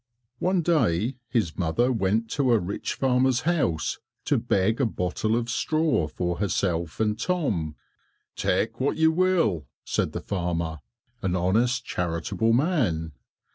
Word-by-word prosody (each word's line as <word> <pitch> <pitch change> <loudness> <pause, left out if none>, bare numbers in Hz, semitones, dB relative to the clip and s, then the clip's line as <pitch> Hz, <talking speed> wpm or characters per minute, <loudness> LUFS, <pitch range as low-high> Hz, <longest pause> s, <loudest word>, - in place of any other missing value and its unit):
One 185 -1 +1
day 125 - +1
his 105 -11 -1
mother 95 +10 +2
went 110 0 +1
to 130 -4 +2
a - - +5
rich 100 +2 -3
farmer's 130 -1 +2
house 145 - 0 0.3
to - - +2
beg 105 +6 +1
a - - +4
bottle 110 +3 -1
of 120 0 -1
straw 155 - +1
for 90 +3 -2
herself 85 -5 -1
and 110 -1 +1
Tom. 110 - -1 0.6
"Take 110 +5 0
what 135 +2 0
you 160 0 +5
will," 165 - +2 0.2
said - - -1
the - - -4
farmer, 85 -4 -2 0.4
an 95 -1 0
honest 115 +8 +1
charitable 85 +6 -1
man. 115 - +1
110 Hz, 135 wpm, -26 LUFS, 90-130 Hz, 0.6 s, a